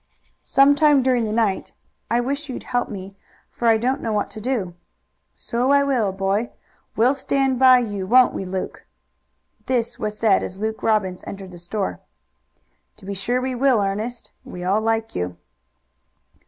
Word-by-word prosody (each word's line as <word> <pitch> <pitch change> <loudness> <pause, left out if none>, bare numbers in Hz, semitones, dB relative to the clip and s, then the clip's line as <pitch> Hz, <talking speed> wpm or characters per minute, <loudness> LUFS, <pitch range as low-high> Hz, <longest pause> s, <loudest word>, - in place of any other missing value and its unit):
"Some 275 +1 +5
time 290 -2 +4
during 250 -3 +2
the 215 - -3
night. 215 -3 0 0.4
I 235 +1 +2
wish 280 +4 -3
you'd 255 - -6
help 245 0 -1
me, 195 -1 -8 0.4
for 235 - -2
I 225 -1 +5
don't 255 +5 -1
know 225 - -2
what 210 -1 -1
to 215 - -8
do." 220 -7 -2 0.6
"So 245 +3 -1
I 280 0 +5
will, 250 -8 +1
boy. 195 +4 -1 0.5
We'll 240 +5 +4
stand 270 -1 0
by 260 -1 +8
you, 205 -5 -4
won't 250 +3 +5
we, - - -4
Luke?" 185 0 -5 0.8
This 245 -3 -1
was 210 0 -3
said 215 -4 +3
as 185 - -5
Luke 220 +2 -3
Robbins 195 -5 0
entered 195 -1 -8
the 175 - -11
store. 175 - -3 1.0
"To - - -15
be 200 - -4
sure 235 +6 -1
we 260 0 -2
will, 255 -1 +3
Ernest. 210 +5 -3
We 180 - -8
all 195 +4 +1
like 225 0 -1
you." 90 0 -3
225 Hz, 170 wpm, -22 LUFS, 195-255 Hz, 1.0 s, by